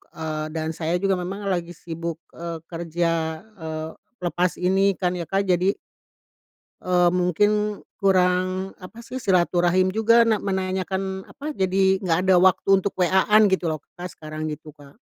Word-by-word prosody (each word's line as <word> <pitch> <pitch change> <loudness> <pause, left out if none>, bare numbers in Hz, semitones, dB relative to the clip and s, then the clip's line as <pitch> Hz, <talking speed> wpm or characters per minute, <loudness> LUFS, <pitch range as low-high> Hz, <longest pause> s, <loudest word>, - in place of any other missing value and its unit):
eee, 155 -1 -3
dan 160 -1 -2
saya 160 +1 -2
juga 195 -1 +2
memang 190 +3 -5
lagi 175 -2 -2
sibuk, 165 0 -6 0.2
eee, 170 -1 -5
kerja, 165 -1 -1
eee, 160 -7 -6 0.3
lepas 175 0 0
ini 195 +2 +2
kan 180 -1 0
ya 175 -2 -4
Kak. 195 0 +1
Jadi, 185 +1 +2 1.1
eee, 180 -1 +3
mungkin 205 +4 +1 0.2
kurang, 185 -1 +2
apa 200 +5 -11
sih, 245 +2 -8
silaturahim 180 -3 +2
juga 225 +3 +4
na 220 - +3
menanyakan, 190 0 -2
eee, - - -16
apa, 280 - -13
jadi 190 0 +1 0.2
gak 165 -3 +2
ada 190 - +6
waktu 185 +1 +3
untuk 200 - -2
WA-an 190 +4 +4
gitu 190 -2 +1
loh 155 - -5 0.2
Kak, 180 +1 -6
sekarang, 155 0 -6
gitu 155 +1 -9
Kak. 145 -1 -17
180 Hz, 155 wpm, -23 LUFS, 170-195 Hz, 1.1 s, ada